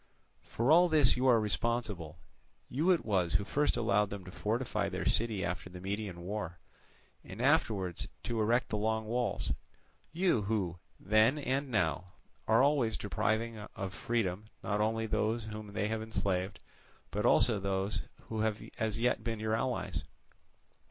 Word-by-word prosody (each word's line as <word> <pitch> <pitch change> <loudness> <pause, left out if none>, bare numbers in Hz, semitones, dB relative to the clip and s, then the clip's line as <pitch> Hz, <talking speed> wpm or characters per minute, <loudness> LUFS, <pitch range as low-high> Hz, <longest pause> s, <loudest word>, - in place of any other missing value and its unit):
"For 120 +5 0
all 175 +2 +7
this 150 -5 +5
you 130 +1 +1
are 120 -3 +6
responsible. 105 -7 -2 0.5
You 155 +8 +1
it 180 -3 +3
was 95 -6 +1
who - - +3
first 145 +6 +1
allowed 105 -3 +2
them 100 -2 -7
to 90 - -9
fortify 115 +6 -1
their - - -4
city 110 -4 +1
after 90 +1 -4
the 90 0 -9
Median 100 -1 -4
war, 90 -2 -4 0.7
and 95 - -10
afterwards 110 - +1 0.2
to 115 -2 -1
erect 120 +4 +2
the 105 - -1
long 110 +1 0
walls—you 125 - -2
who, 95 -5 -1 0.2
then 110 +7 +4
and 135 0 -1
now, 90 -4 0 0.3
are 115 +3 +5
always 135 -6 +2
depriving 110 +2 -1 0.2
of 95 0 -4
freedom 105 -4 -1 0.2
not 105 0 0
only 110 +1 +1
those 110 +1 0
whom 105 -1 -7
they 105 - 0
have 110 0 -1
enslaved, 100 -3 -2 0.5
but 105 +1 -1
also 115 -2 +4
those 95 +1 -1 0.2
who 110 - -5
have 110 -1 0 0.2
as 110 0 0
yet 120 +1 +1
been 115 -2 -2
your 110 0 -1
allies. 125 +3 -1
110 Hz, 155 wpm, -32 LUFS, 100-120 Hz, 0.7 s, all